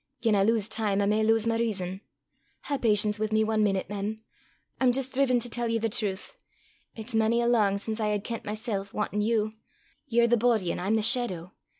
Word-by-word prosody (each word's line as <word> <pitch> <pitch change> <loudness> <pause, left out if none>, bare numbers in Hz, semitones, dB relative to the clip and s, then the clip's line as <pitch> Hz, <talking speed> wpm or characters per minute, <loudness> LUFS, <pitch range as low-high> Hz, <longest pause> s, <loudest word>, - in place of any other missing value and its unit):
Gien 225 -2 +2
I 200 - +3
lowse 220 -1 +1
time 210 -3 -1
I 200 - +2
may 210 +2 +1
lowse 225 0 +2
my 230 0 0
rizon. 190 -4 -2 0.6
Hae 280 -2 -3
patience 210 -2 +4
wi' 215 - 0
me 220 0 +2
ae 220 0 -1
meenute, 200 -3 +1
mem; 205 +2 -4 0.6
I'm 255 -2 +4
jist 265 +1 0
driven 255 -2 +2
to 245 - -5
tell 240 0 -3
ye 230 0 0
the 225 0 -1
trowth. 210 - -3 0.6
It's 225 +2 -8
mony 225 +1 +2
a 235 - +1
lang 215 -5 +2
sin 220 +2 -4
I 215 - 0
hae 210 0 0
kent 230 +2 -6
mysel' 210 -2 -4
wantin' 210 0 -2
you. 215 0 0 0.5
Ye're 235 0 +3
the 240 0 +3
boady, 220 -6 +1
an' - - -4
I'm 195 +5 0
the 220 - +1
shaidow. 210 -8 +1
220 Hz, 215 wpm, -27 LUFS, 205-235 Hz, 0.6 s, patience